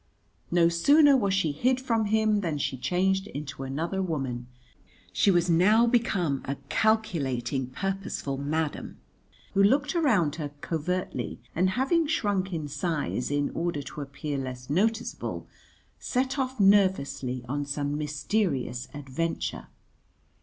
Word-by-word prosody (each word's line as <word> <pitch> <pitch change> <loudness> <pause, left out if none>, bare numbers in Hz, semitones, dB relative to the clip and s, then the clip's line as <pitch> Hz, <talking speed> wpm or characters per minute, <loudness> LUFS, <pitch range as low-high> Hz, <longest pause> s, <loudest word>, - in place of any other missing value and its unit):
No 170 -1 +4
sooner 280 - +5
was 200 -7 +2
she 190 -5 +1
hid 250 - +1
from 230 -4 0
him 215 0 +2
than 165 -6 -2
she 140 - -1
changed 190 +9 0
into 145 -6 -7
another 160 +8 -2
woman; 135 -9 -3 0.7
she - - +3
was 175 -2 +3
now 195 +7 +5
become 200 - +1
a 140 - -2
calculating 140 - 0
purposeful 195 -2 -3
madam, 150 +2 -2 0.6
who 195 - +3
looked 275 +8 +3
around 220 - +2
her 150 -3 -3
covertly 175 +4 -3
and, 185 +3 +2
having 320 +5 +2
shrunk 205 - 0
in 160 -4 -3
size 145 -3 -2
in 145 0 0
order 165 -4 -2
to 150 - -7
appear 140 +1 -4
less 130 0 -6
noticeable, 220 +8 -1 0.5
set 260 +2 -1
off 260 -2 -2
nervously 185 -11 +2
on 145 +3 -2
some 145 0 -2
mysterious 145 - -1
adventure. 145 +4 -3
170 Hz, 130 wpm, -27 LUFS, 140-210 Hz, 0.7 s, sooner